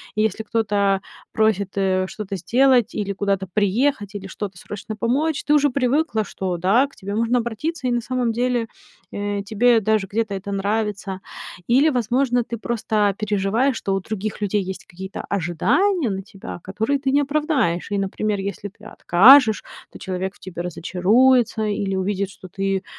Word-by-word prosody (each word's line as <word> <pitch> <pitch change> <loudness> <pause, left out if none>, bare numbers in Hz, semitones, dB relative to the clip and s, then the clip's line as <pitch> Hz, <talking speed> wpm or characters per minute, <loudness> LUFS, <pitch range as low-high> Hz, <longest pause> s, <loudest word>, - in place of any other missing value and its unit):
и 215 - +2
если 220 +1 -1
кто-то 205 -3 +1 0.3
просит, 205 -3 +1
э, 185 -1 +1
что-то 205 -2 -5
сделать, 250 +4 +3
или 200 -1 -2
куда-то 195 -1 -1
приехать, 210 +1 +1
или 195 -1 -6
что-то 195 -1 -6
срочно 210 +4 -7
помочь, 270 +8 0
ты 295 - +3
уже 290 -1 +4
привыкла, 255 -3 +1
что 185 -3 -3
да, 200 +11 +3
к 280 - -22
тебе 200 0 -5
можно 230 +2 +2
обратиться, 255 +5 -3
и - - +1
на 240 0 +1
самом 245 -1 -1
деле, 240 0 0 0.4
э, 205 0 -3
тебе 225 +3 +3
даже 215 -1 +1
где-то 215 +1 -2
это 195 +1 -5
нравится, 200 -1 -2 0.5
или, 270 +6 +4
возможно, 245 -1 +1
ты 235 - -6
просто 215 -3 0
переживаешь, 215 +5 +1
что 195 - -2
у 195 - 0
других 215 +2 -5
людей 205 0 0
есть 190 0 -7
какие-то 190 +2 -7
ожидания 230 - +1
на 195 -1 -3
тебя, 195 -3 -9
которые 220 +9 -1
ты 265 -1 -1
не 285 - +4
оправдаешь, 275 - 0
и, 205 - 0
например, 200 +1 -1
если 200 +1 -4
ты 210 +2 -19
откажешь- 220 +5 +6 0.3
то - - -11
человек 190 0 -4
в - - -23
тебе 175 -2 -7
разочаруется 220 +8 +2
или 200 -2 -1
увидит, 195 +1 -1
что 190 - -12
ты 195 +1 -2
210 Hz, 170 wpm, -22 LUFS, 195-245 Hz, 0.5 s, откажешь